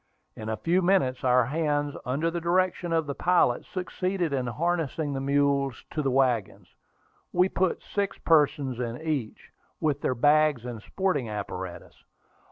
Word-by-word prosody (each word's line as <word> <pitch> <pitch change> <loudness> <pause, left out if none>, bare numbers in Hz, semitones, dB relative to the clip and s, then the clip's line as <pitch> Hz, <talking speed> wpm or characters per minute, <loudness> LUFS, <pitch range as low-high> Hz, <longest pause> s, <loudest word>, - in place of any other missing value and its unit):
In 110 0 -6
a 110 - -2
few 175 +3 +1
minutes, 175 -9 +2
our 125 -1 +4
hands, 145 +1 -1
under 150 +6 0
the 170 0 -3
direction 175 0 +1
of 165 -1 +1
the 140 - -3
pilot, 170 -7 +2
succeeded 185 -3 -2
in 130 -2 -1
harnessing 160 +2 -1
the 135 - -3
mules 140 -1 +1
to 155 - -1
the 135 - 0
wagons. 115 -8 0 0.6
We 180 +1 +3
put 185 -1 0
six 200 -1 -2
persons 145 -5 +2
in 120 0 -3
each, 150 -8 -4 0.3
with 145 -2 0
their 130 - 0
bags 145 -1 +3
and 120 -3 -6
sporting 155 - -1
apparatus. 95 -3 -6
145 Hz, 155 wpm, -27 LUFS, 125-170 Hz, 0.6 s, our